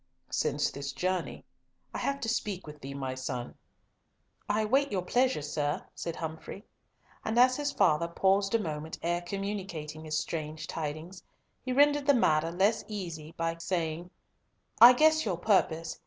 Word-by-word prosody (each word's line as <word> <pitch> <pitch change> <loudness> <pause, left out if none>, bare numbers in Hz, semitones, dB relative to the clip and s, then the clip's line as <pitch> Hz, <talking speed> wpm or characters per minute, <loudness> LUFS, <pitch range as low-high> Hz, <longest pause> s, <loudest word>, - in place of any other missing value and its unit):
"Since - - 0
this 140 0 -5
journey. 185 +1 -2 0.5
I - - -3
have 275 0 -1
to - - -2
speak 210 -5 -2
with 150 -1 -11
thee, 140 +1 -7
my 135 -2 -3
son." 130 -2 -5 1.0
"I 215 +1 +1
wait 275 +6 +2
your 190 -3 -1
pleasure, 250 - +1
sir," 145 0 -2
said 170 -1 -5
Humfrey, 160 +5 -7 0.6
and 220 +1 -2
as 255 +1 +6
his 290 0 -1
father 170 - +2
paused 195 +4 +2
a - - +3
moment 155 -4 -4
ere 175 +1 0
communicating 180 -5 -5
his 155 0 -1
strange 155 -1 -4
tidings, 160 +4 -5 0.4
he 255 - -3
rendered 290 +2 +4
the 285 - +6
matter 160 -7 +2
less 195 +6 +2
easy 170 -7 -6
by 165 0 -1
saying, 170 -1 -2 0.7
"I 240 +2 +11
guess 315 +4 +4
your 190 -6 -1
purpose. 165 -4 +1
175 Hz, 155 wpm, -30 LUFS, 155-220 Hz, 1.0 s, I